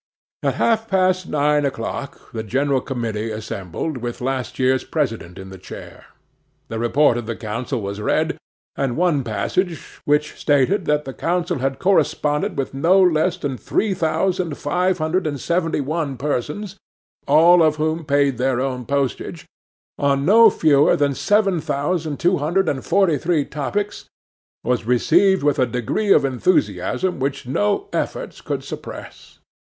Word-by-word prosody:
At - - 0
half 225 -1 +1
past 185 -2 +1
nine 150 0 +2
o'clock 135 +1 -5
the 110 - -3
general 135 +4 0
committee 115 -5 -3
assembled, 110 - -5
with 120 -1 -5
the - - -9
last 130 -1 -3
year's 130 0 +2
president 115 - -3
in 95 0 -9
the 95 - -10
chair. - - -11 0.6
The 115 - -4
report 120 +2 +3
of 115 - -8
the 115 - -3
council 115 +3 -4
was 100 +1 -5
read; - - 0 0.4
and 135 -3 -1
one 165 -6 +2
passage, 165 - -3
which 150 +1 +1
stated 150 +6 +2
that 150 0 +1
the 135 - -6
council 175 -1 -1
had 135 +1 -1
corresponded 150 -6 +1
with 135 - -2
no 170 +8 +3
less 180 0 +3
than 140 -7 -3
three 210 -2 0
thousand 175 -1 -1
five 180 +5 0
hundred 160 +2 0
and 145 -2 -3
seventy 165 0 0
one 145 -1 -2
persons, 150 - -3 0.5
(all 170 +4 +6
of 155 -1 +4
whom 155 +1 -1
paid 140 -4 +1
their 130 -1 +1
own 130 -2 -3
postage,) 140 -3 -2 0.5
on 140 -1 +1
no 225 +5 +7
fewer 150 -6 +4
than 145 -1 +1
seven 195 +1 +2
thousand 150 +1 -2
two 180 +1 +2
hundred 175 +7 +1
and 130 -2 -1
forty 175 -8 +2
three 160 -3 +1
topics, 200 +9 -3 0.6
was 125 -1 0
received 175 +9 +3
with 145 0 +2
a 130 - +3
degree 125 - -1
of - - +5
enthusiasm 130 - 0
which 135 -1 -2
no 105 -5 0
efforts - - -3
could - - -4
suppress. - - -9
145 Hz, 155 wpm, -21 LUFS, 130-175 Hz, 0.6 s, no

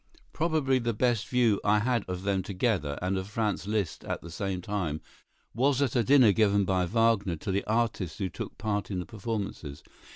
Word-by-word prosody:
Probably 155 -5 +1
the 115 -2 -1
best 120 -1 +1
view 120 -5 +2
I 105 +1 +4
had 115 0 +1
of 90 0 -4
them 100 -1 +1
together, 90 - -1
and 95 +1 0
of 95 - -6
Franz 105 -2 -2
Liszt 105 -6 -2
at - - -4
the 85 - -9
same 95 +2 -3
time, 90 -5 -2 0.5
was 135 +2 +2
at 135 -4 +1
a 120 - +3
dinner 130 -4 +6
given 100 -1 +3
by 90 -1 +1
Wagner 110 -3 +2
to 95 +6 -4
the 100 +1 0
artists 110 -7 -1
who 95 - -1
took 90 - -7
part 105 -2 -2
in 95 - -3
the 90 - -3
performances. 100 -9 -5
105 Hz, 195 wpm, -28 LUFS, 95-115 Hz, 0.5 s, dinner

